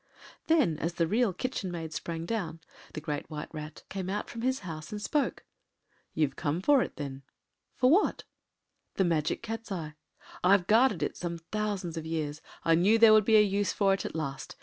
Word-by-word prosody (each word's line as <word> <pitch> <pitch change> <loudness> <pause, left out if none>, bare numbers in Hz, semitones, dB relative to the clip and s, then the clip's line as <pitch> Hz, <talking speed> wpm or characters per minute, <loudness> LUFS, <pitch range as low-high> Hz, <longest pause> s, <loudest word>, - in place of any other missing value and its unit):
Then, 285 - +3
as 170 +1 -2
the 170 - +2
Real 220 +5 +2
Kitchen 195 0 -3
Maid 165 -2 -5
sprang 165 +1 -4
down, 170 -7 -3 0.4
the 155 - -4
Great 150 -2 -4
White 150 +1 -6
Rat 155 0 -8
came 190 -1 -4
out 205 +2 -3
from 230 - -6
his 260 +2 0
house 160 -3 -7
and 210 - -4
spoke. 290 +7 -1 0.7
“You’ve 150 -4 +1
come 155 +3 -1
for 275 +7 +4
it, - - -3
then?” 140 -3 -6 0.5
“For 255 +1 +4
what?” 385 +6 +3 0.7
“The 190 - +2
Magic 160 +3 0
Cat’s 225 -1 -5
eye. 160 -5 -4 0.5
I’ve 185 0 +5
guarded 220 -1 +4
it - - -3
some 170 -1 -4
thousands 190 -1 -3
of 160 0 -5
years. 155 -2 -3 0.2
I 165 - +5
knew 190 +7 +5
there 225 -1 +8
would 215 -2 +6
be 220 -1 +6
a 210 - +7
use 200 -2 0
for 195 -2 +3
it 195 - -1
at - - -5
last. 140 -4 -4
180 Hz, 195 wpm, -29 LUFS, 160-215 Hz, 0.7 s, there